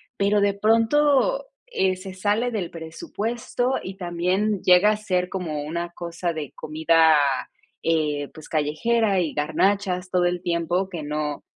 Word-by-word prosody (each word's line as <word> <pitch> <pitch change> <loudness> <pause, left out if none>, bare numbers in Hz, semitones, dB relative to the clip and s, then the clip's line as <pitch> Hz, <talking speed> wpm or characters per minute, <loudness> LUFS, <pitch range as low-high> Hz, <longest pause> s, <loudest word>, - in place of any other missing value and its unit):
pero 205 -1 +2
de 200 0 +3
pronto, 280 - +2 0.2
eh, 190 - +1
se 190 0 -8
sale 210 +5 0
del 195 -7 -3
presupuesto, 230 - -3
y 190 - -6
también 185 +3 0
llega 180 +3 +6
a 215 - +1
ser 180 -4 -1
como 165 -6 -3
una 170 +3 -4
cosa 170 0 -4
de 155 -4 -5
comida, 160 +1 +3 0.7
eh, 150 -3 0
pues 155 -2 -12
callejera, 195 +8 +1
y 165 -4 -1
garnachas 185 +4 0
todo 180 -1 +2
el 175 0 0
tiempo 175 +1 0
que 170 -5 -6
no 150 0 -3
180 Hz, 145 wpm, -24 LUFS, 165-210 Hz, 0.7 s, llega